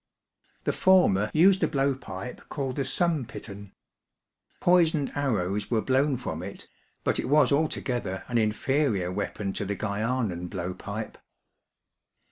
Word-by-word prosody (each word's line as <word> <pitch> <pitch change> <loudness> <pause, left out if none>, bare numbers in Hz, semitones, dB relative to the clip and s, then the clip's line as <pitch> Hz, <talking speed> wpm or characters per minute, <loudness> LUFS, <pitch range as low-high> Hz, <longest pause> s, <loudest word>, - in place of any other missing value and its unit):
The - - 0
former 110 - +4
used 185 +4 +5
a 160 - +3
blow 140 -1 +1
pipe 100 -3 -8
called 135 -3 -3
the 140 - 0
sumpit 160 -11 0
an. 100 -1 -10 0.9
Poisoned 165 -5 +3
arrows 105 -8 -1
were 115 - +2
blown 135 +1 +2
firom 85 -9 -5
it; 100 +1 -8 0.4
but - - +1
it - - -2
was 145 -3 +5
altogether 125 -9 -1
an 120 -1 +1
inferior 110 -3 +1
weapon 100 0 -3
to - - -2
the 100 +1 -2
Guianan 105 -3 -2
blow 90 0 -4
pipe. 100 +4 -6
120 Hz, 135 wpm, -27 LUFS, 100-140 Hz, 0.9 s, used